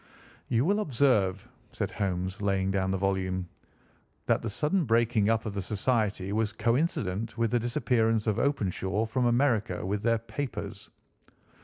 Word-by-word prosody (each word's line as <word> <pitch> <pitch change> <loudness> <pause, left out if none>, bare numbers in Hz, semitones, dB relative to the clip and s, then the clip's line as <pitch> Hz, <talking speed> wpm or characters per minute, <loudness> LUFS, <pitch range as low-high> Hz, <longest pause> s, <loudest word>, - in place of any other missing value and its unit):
"You 120 +2 +2
will 200 +4 +2
observe," 120 - +1 0.3
said - - -2
Holmes, 95 -1 -2
laying 95 -1 +1
down 95 -1 0
the 95 - 0
volume, 95 -1 -1 0.8
"that - - +2
the 115 - -3
sudden 155 - +1
breaking 115 -3 +2
up 115 0 +1
of 105 - -3
the 100 - -2
society 105 -1 0
was 110 -1 +1
coincident 115 - -1
with 115 -2 +1
the 120 - +2
disappearance 115 -3 +1
of 110 -3 0
Openshaw 105 -5 0
from 125 +2 0
America 120 -7 +1
with 100 +2 -1
their 115 +1 +2
papers. 110 -3 -6
110 Hz, 150 wpm, -28 LUFS, 95-120 Hz, 0.8 s, You